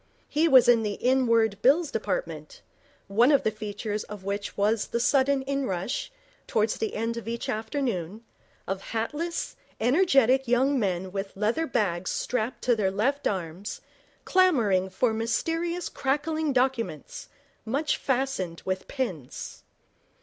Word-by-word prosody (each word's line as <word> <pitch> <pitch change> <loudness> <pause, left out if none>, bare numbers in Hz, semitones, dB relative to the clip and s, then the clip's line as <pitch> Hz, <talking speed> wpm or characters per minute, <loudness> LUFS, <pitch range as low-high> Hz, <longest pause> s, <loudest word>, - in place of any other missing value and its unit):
He 315 +3 +2
was 260 -6 +7
in 240 -2 +6
the 210 -2 -2
Inward 230 -5 +2
Bills 290 +5 +4
Department, - - -4 0.4
one 230 +8 +4
of 280 - +4
the 220 - +1
features 210 0 -4
of 205 -2 -9
which 200 +1 -4
was 210 +2 +1
the 235 - -2
sudden 270 +2 +3
inrush, 265 - -2 0.4
towards 215 0 +1
the 220 - -3
end 230 +1 -2
of 230 - -7
each 235 0 -3
afternoon, 220 - -3 0.4
of 195 0 -2
hatless, 295 +12 -3 0.2
energetic 265 -1 +4
young 260 +3 +3
men 185 -3 -1
with 195 0 -5
leather 230 +11 0
bags 185 -8 0
strapped 245 0 -2
to 245 -2 +3
their 205 -3 +1
left 255 +9 0
arms, 185 0 -4 0.5
clamouring 230 - +3
for 220 +5 +1
mysterious 330 +10 -1
crackling 300 +3 -1
documents, 260 - -1 0.3
much 280 +7 0
fastened 255 -11 -2
with 185 0 -2
pins. 185 - -5
235 Hz, 135 wpm, -27 LUFS, 205-275 Hz, 0.5 s, was